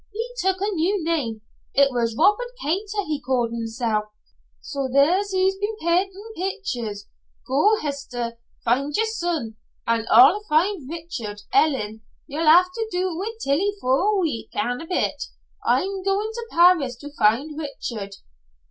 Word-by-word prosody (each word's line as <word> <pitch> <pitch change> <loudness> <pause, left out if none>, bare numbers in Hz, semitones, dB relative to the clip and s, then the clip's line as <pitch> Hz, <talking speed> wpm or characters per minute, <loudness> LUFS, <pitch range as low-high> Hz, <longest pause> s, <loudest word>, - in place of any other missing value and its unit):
He 460 +4 -4
took 380 0 +1
a 410 +1 0
new 365 +2 0
name. 275 -10 -1 0.3
It 280 0 +5
was 230 -2 -1
Robert 450 +4 +3
Kater 400 +6 -2
he 300 -3 -3
called 245 -2 0
himsel'. 225 -2 -2 0.5
So, 270 - -4
there 285 +8 +4
he's 380 0 +2
been 415 +2 -2
pentin' 385 +6 -1
pictures. 250 - -4 0.4
Go, 410 +11 +3
Hester, 280 -4 -5
an' 235 -1 -3 0.3
find 275 +5 +1
yer 445 - +2
son, 345 - -3 0.3
an' 230 -1 0
I'll 265 - +7
find 315 -2 +1
Richard. 245 -12 -6
Ellen, 240 - +2 0.2
ye'll 315 +2 -3
have 360 +3 +7
to 450 +1 -3
do 360 -1 -1
wi' 420 +6 -4
Tillie 365 +10 +1
for 260 -4 +2
a 410 +1 +2
week 245 - -2
an' 245 0 -1
a 330 - -9
bit, 360 - -1 0.4
I'm 390 0 +1
going 395 +3 0
to 470 0 -6
Paris 340 - +4
to 290 +4 -11
find 245 +7 +2
Richard." 230 -9 -5
310 Hz, 155 wpm, -23 LUFS, 245-385 Hz, 0.5 s, I'll